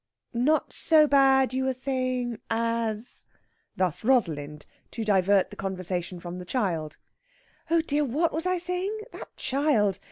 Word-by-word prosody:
_'" -, -, -62 dB, 0.4 s
"Not 305 Hz, +5 st, +2 dB
so 315 Hz, -2 st, +5 dB
bad, 270 Hz, -3 st, +4 dB
you 260 Hz, 0 st, 0 dB
were 265 Hz, -1 st, 0 dB
saying, 255 Hz, -3 st, -2 dB
as...?" 230 Hz, 0 st, -2 dB, 0.5 s
Thus 180 Hz, -2 st, -1 dB
Rosalind, 155 Hz, -, 0 dB, 0.2 s
to 230 Hz, -, -5 dB
divert 195 Hz, -1 st, +3 dB
the -, -, -9 dB
conversation 185 Hz, -2 st, -4 dB
from 175 Hz, +1 st, -7 dB
the -, -, -6 dB
child. 175 Hz, -, -2 dB, 0.7 s
"Oh 335 Hz, 0 st, +4 dB
dear! 300 Hz, -1 st, 0 dB
What 295 Hz, +6 st, 0 dB
was 325 Hz, +4 st, -2 dB
I 365 Hz, 0 st, +1 dB
saying? 360 Hz, +4 st, -2 dB, 0.2 s
That -, -, -10 dB
child! 255 Hz, -8 st, +1 dB
240 Hz, 150 wpm, -26 LUFS, 190-280 Hz, 0.7 s, so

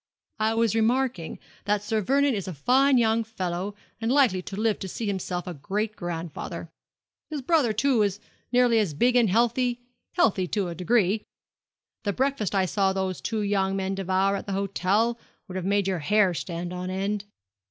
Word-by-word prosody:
'I 220 Hz, +1 st, +1 dB
was 230 Hz, -2 st, +2 dB
remarking 225 Hz, -5 st, 0 dB, 0.3 s
that 205 Hz, 0 st, +1 dB
Sir 215 Hz, +1 st, 0 dB
Vernon 280 Hz, +5 st, +2 dB
is 200 Hz, -4 st, -3 dB
a 185 Hz, -, -5 dB
fine 260 Hz, -, +4 dB
young 225 Hz, -1 st, +3 dB
fellow, 190 Hz, -2 st, -4 dB, 0.2 s
and 225 Hz, +1 st, -1 dB
likely 255 Hz, -10 st, +4 dB
to 190 Hz, -, -7 dB
live 215 Hz, +1 st, 0 dB
to 190 Hz, -, -5 dB
see 225 Hz, +5 st, -5 dB
himself 185 Hz, -3 st, -2 dB
a 180 Hz, -, -5 dB
great 205 Hz, +8 st, -3 dB
grandfather. 170 Hz, -4 st, -5 dB, 0.6 s
His 300 Hz, -4 st, -4 dB
brother, 295 Hz, -6 st, +3 dB
too, 235 Hz, +2 st, +2 dB
is 200 Hz, -1 st, 0 dB, 0.3 s
nearly 245 Hz, -2 st, +4 dB
as 185 Hz, -9 st, 0 dB
big 245 Hz, +10 st, +3 dB
and 235 Hz, -4 st, +4 dB
healthy 240 Hz, +3 st, +2 dB, 0.3 s
healthy 190 Hz, -4 st, +2 dB
to 195 Hz, -1 st, -1 dB
a -, -, -4 dB
degree. 200 Hz, +3 st, +2 dB, 0.8 s
The 205 Hz, -1 st, 0 dB
breakfast 260 Hz, -6 st, 0 dB
I 190 Hz, -1 st, +3 dB
saw 190 Hz, +1 st, +1 dB
those 190 Hz, -1 st, -2 dB
two 220 Hz, -2 st, -2 dB
young 195 Hz, -1 st, +1 dB
men 190 Hz, 0 st, -1 dB
devour 195 Hz, +1 st, +1 dB
at -, -, -6 dB
the 200 Hz, -, -2 dB
hotel 200 Hz, +4 st, +1 dB, 0.3 s
would 185 Hz, -, -8 dB
have 185 Hz, -1 st, -3 dB
made 200 Hz, 0 st, +1 dB
your 185 Hz, -3 st, 0 dB
hair 195 Hz, +3 st, +3 dB
stand 175 Hz, 0 st, -4 dB
on 180 Hz, 0 st, -4 dB
end. 195 Hz, +2 st, -2 dB
205 Hz, 185 wpm, -26 LUFS, 185-230 Hz, 0.8 s, fine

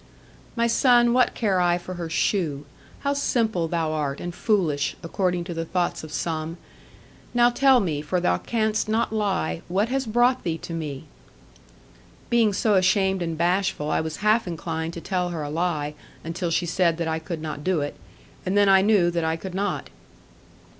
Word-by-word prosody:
'My 235 Hz, -1 st, +2 dB
son, 240 Hz, 0 st, +4 dB
what 250 Hz, 0 st, +3 dB
care 195 Hz, -5 st, +1 dB
I 175 Hz, 0 st, +3 dB
for 180 Hz, +1 st, -7 dB
her 175 Hz, -2 st, -5 dB
shoe? 160 Hz, -5 st, 0 dB, 0.4 s
How 280 Hz, 0 st, 0 dB
simple 225 Hz, -11 st, 0 dB
thou 160 Hz, -1 st, -1 dB
art, 145 Hz, -3 st, -2 dB
and 175 Hz, 0 st, -5 dB
foolish! 170 Hz, -9 st, 0 dB
according 180 Hz, +1 st, -1 dB
to 175 Hz, 0 st, -6 dB
the 165 Hz, 0 st, -3 dB
thoughts 175 Hz, 0 st, -1 dB
of 155 Hz, -, -9 dB
some. 160 Hz, +1 st, -3 dB, 0.8 s
Now 240 Hz, 0 st, +5 dB
tell 265 Hz, +1 st, +5 dB
me, 160 Hz, -9 st, -1 dB
for 155 Hz, +5 st, -1 dB
thou 90 Hz, -, +1 dB
canst 220 Hz, -2 st, -1 dB
not 220 Hz, 0 st, 0 dB
lie, 195 Hz, -, -1 dB
what 200 Hz, +6 st, 0 dB
has 265 Hz, -1 st, -1 dB
brought 240 Hz, +3 st, +3 dB
thee 165 Hz, -2 st, -2 dB
to 165 Hz, -, -8 dB
me.' 150 Hz, -4 st, -5 dB, 1.3 s
Being 230 Hz, -3 st, +4 dB
so 210 Hz, +2 st, +1 dB
ashamed 190 Hz, 0 st, +3 dB
and 165 Hz, -2 st, -2 dB
bashful, 175 Hz, -3 st, 0 dB
I -, -, +2 dB
was 160 Hz, -1 st, -4 dB
half 215 Hz, 0 st, +3 dB
inclined 165 Hz, -1 st, -4 dB
to 170 Hz, -, -6 dB
tell 180 Hz, -1 st, -1 dB
her 165 Hz, -3 st, -4 dB
a 145 Hz, -, -5 dB
lie, 155 Hz, -3 st, -1 dB, 0.3 s
until 170 Hz, +2 st, -3 dB
she 175 Hz, +2 st, +1 dB
said 170 Hz, -1 st, +1 dB
that 170 Hz, -1 st, -2 dB
I 160 Hz, 0 st, -1 dB
could 160 Hz, 0 st, -5 dB
not 155 Hz, -2 st, -5 dB
do 180 Hz, -3 st, +1 dB
it; 145 Hz, -, -4 dB, 0.5 s
and 190 Hz, +2 st, 0 dB
then 205 Hz, 0 st, +5 dB
I 190 Hz, 0 st, +6 dB
knew 195 Hz, -4 st, +3 dB
that 170 Hz, -1 st, -1 dB
I 160 Hz, 0 st, 0 dB
could 185 Hz, +2 st, -7 dB
not. 200 Hz, +2 st, -2 dB
175 Hz, 190 wpm, -24 LUFS, 160-210 Hz, 1.3 s, I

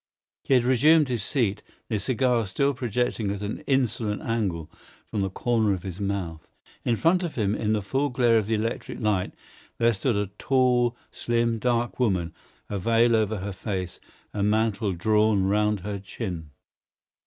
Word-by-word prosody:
He 135 Hz, -, +3 dB
had 125 Hz, -, +4 dB
resumed 145 Hz, +4 st, +4 dB
his 120 Hz, -4 st, -1 dB
seat, 105 Hz, -3 st, 0 dB, 0.3 s
the 110 Hz, -3 st, -1 dB
cigar 120 Hz, 0 st, +1 dB
still 140 Hz, +9 st, +1 dB
projecting 120 Hz, -3 st, -1 dB
at 100 Hz, 0 st, -3 dB
an 105 Hz, +2 st, -4 dB
insolent 120 Hz, -6 st, 0 dB
angle 95 Hz, -9 st, -1 dB, 0.4 s
from 105 Hz, -, -3 dB
the 95 Hz, -, 0 dB
corner 110 Hz, +1 st, +1 dB
of 90 Hz, -, -9 dB
his 95 Hz, -1 st, -6 dB
mouth. 95 Hz, -6 st, -3 dB, 0.3 s
In 120 Hz, -, +1 dB
front 170 Hz, +9 st, +3 dB
of 170 Hz, -3 st, -4 dB
him, 105 Hz, -4 st, +1 dB
in 110 Hz, 0 st, 0 dB
the 105 Hz, -2 st, 0 dB
full 135 Hz, +8 st, 0 dB
glare 120 Hz, -3 st, +3 dB
of 105 Hz, -, -3 dB
the 110 Hz, -, +1 dB
electric 110 Hz, +2 st, -3 dB
light, 105 Hz, -4 st, 0 dB, 0.5 s
there 115 Hz, 0 st, +3 dB
stood 110 Hz, +4 st, 0 dB
a 100 Hz, -1 st, -1 dB
tall, 125 Hz, -2 st, +2 dB
slim, 115 Hz, -1 st, 0 dB
dark 120 Hz, +1 st, 0 dB
woman, 95 Hz, -9 st, +1 dB, 0.3 s
a 100 Hz, -, -3 dB
veil 115 Hz, +4 st, +3 dB
over 110 Hz, -1 st, +1 dB
her 100 Hz, +1 st, -4 dB
face, 95 Hz, -2 st, -4 dB, 0.3 s
a 105 Hz, -, -2 dB
mantle 105 Hz, -1 st, +1 dB
drawn 105 Hz, +2 st, +2 dB
round 105 Hz, +1 st, +1 dB
her 100 Hz, +1 st, -4 dB
chin. 95 Hz, -5 st, -6 dB
110 Hz, 170 wpm, -26 LUFS, 100-120 Hz, 0.5 s, had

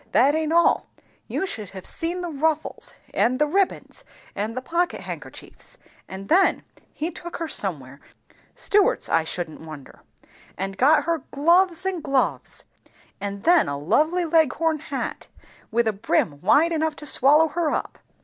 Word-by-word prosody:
That 275 Hz, +4 st, +5 dB
aint 315 Hz, 0 st, -1 dB
all; 340 Hz, +1 st, +3 dB, 0.4 s
you -, -, -2 dB
should 215 Hz, -, -5 dB
have 190 Hz, -1 st, -10 dB
seen 345 Hz, +2 st, -2 dB
the 350 Hz, -1 st, -4 dB
ruffles, 310 Hz, +1 st, -2 dB, 0.2 s
and 255 Hz, +2 st, +2 dB
the 300 Hz, -, +3 dB
ribbands, 390 Hz, +8 st, -1 dB, 0.3 s
and 215 Hz, +4 st, -3 dB
the -, -, -2 dB
pockethandkerchiefs; 345 Hz, +5 st, -5 dB, 0.3 s
and 190 Hz, +1 st, -8 dB
then 375 Hz, +4 st, +3 dB, 0.3 s
he 320 Hz, +4 st, -4 dB
took 345 Hz, -1 st, -8 dB
her 330 Hz, -, -4 dB
somewhere, 140 Hz, -, -3 dB, 0.6 s
Stewart's, 410 Hz, -1 st, +2 dB
I 165 Hz, -, +3 dB
shouldn't 160 Hz, 0 st, -5 dB
wonder, 155 Hz, -4 st, -11 dB, 0.6 s
and 195 Hz, +1 st, -4 dB
got 290 Hz, +5 st, +4 dB
her 335 Hz, +1 st, 0 dB
gloves 340 Hz, +4 st, +2 dB
and 375 Hz, -3 st, -2 dB
gloves; 275 Hz, -3 st, -1 dB, 0.6 s
and 200 Hz, 0 st, -5 dB
then 345 Hz, -, +4 dB
a 140 Hz, -, -3 dB
lovely 310 Hz, -, +1 dB
Leghorn 320 Hz, 0 st, +2 dB
hat, 320 Hz, -, -5 dB, 0.4 s
with 235 Hz, +1 st, +1 dB
a 220 Hz, -, +1 dB
brim 175 Hz, -8 st, -1 dB
wide 295 Hz, -, +4 dB
enough 315 Hz, -1 st, 0 dB
to 300 Hz, -, -10 dB
swallow 300 Hz, +3 st, +5 dB
her 330 Hz, 0 st, -1 dB
up. -, -, -3 dB
300 Hz, 150 wpm, -23 LUFS, 200-335 Hz, 0.6 s, That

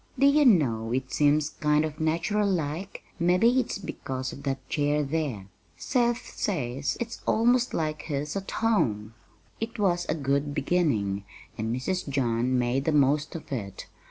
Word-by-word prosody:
"Do 275 Hz, -, +4 dB
you 290 Hz, +1 st, +5 dB
know, 120 Hz, -, +3 dB
it 130 Hz, +1 st, -2 dB
seems 150 Hz, +1 st, +3 dB
kind 150 Hz, +1 st, +1 dB
of 150 Hz, -1 st, -6 dB
natural 170 Hz, +6 st, +1 dB
like; 170 Hz, +2 st, -3 dB, 0.2 s
mebbe 180 Hz, +3 st, +3 dB
it's 245 Hz, -1 st, +3 dB
because 130 Hz, -9 st, -5 dB
of 140 Hz, -, -9 dB
that 135 Hz, -1 st, -3 dB
chair 150 Hz, 0 st, +1 dB
there. 140 Hz, -9 st, -2 dB, 0.3 s
Seth 240 Hz, -2 st, 0 dB
says 140 Hz, -, -2 dB
it's 235 Hz, -1 st, -5 dB
almost 240 Hz, +2 st, +3 dB
like 155 Hz, -1 st, -1 dB
his 150 Hz, 0 st, -3 dB
at 195 Hz, -1 st, -4 dB
home." 115 Hz, -, 0 dB, 0.5 s
It 225 Hz, +2 st, -4 dB
was 175 Hz, -4 st, +1 dB
a 155 Hz, -, +1 dB
good 140 Hz, 0 st, -1 dB
beginning, 135 Hz, -, 0 dB, 0.3 s
and 110 Hz, 0 st, -2 dB
Mrs. 140 Hz, +8 st, -2 dB
John 125 Hz, -2 st, +1 dB
made 125 Hz, +3 st, 0 dB
the 160 Hz, -, +2 dB
most 145 Hz, +1 st, +2 dB
of 165 Hz, -, -8 dB
it. 100 Hz, -7 st, -5 dB
150 Hz, 155 wpm, -27 LUFS, 130-185 Hz, 0.5 s, you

